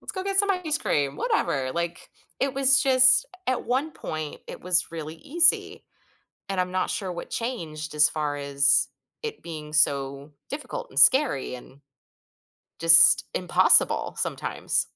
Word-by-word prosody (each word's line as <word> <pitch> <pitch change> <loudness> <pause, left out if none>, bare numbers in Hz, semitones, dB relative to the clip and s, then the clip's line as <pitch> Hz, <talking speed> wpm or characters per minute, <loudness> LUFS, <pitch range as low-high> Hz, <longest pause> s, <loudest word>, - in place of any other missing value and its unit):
"Let's - - -7
go 375 - -7
get 390 0 -3
some 405 0 +2
ice 335 -5 -1
cream," 140 - -3
whatever, 135 -3 -3
like, 170 +1 -7 0.3
it 270 0 -3
was 270 0 +3
just 260 - +5 0.2
at 255 - -4
one 270 +6 -3
point, 155 -1 -9
it - - -12
was 180 -1 0
really 160 -1 -9
easy, 330 - +1 0.7
and 195 -2 -5
I'm 180 0 -4
not 185 0 -4
sure 190 -3 -5
what 175 - -10
changed 160 -11 -7
as 150 0 +3
far 150 -2 -5
as 140 0 +3 0.4
it 445 -1 -8
being 155 -2 -11
so 140 -1 0 0.2
difficult 485 - -8
and - - -3
scary 260 - +3
and 130 +3 -17 1.0
just 165 0 +7
impossible - - +2
sometimes. - - -3
170 Hz, 150 wpm, -22 LUFS, -, 1.0 s, just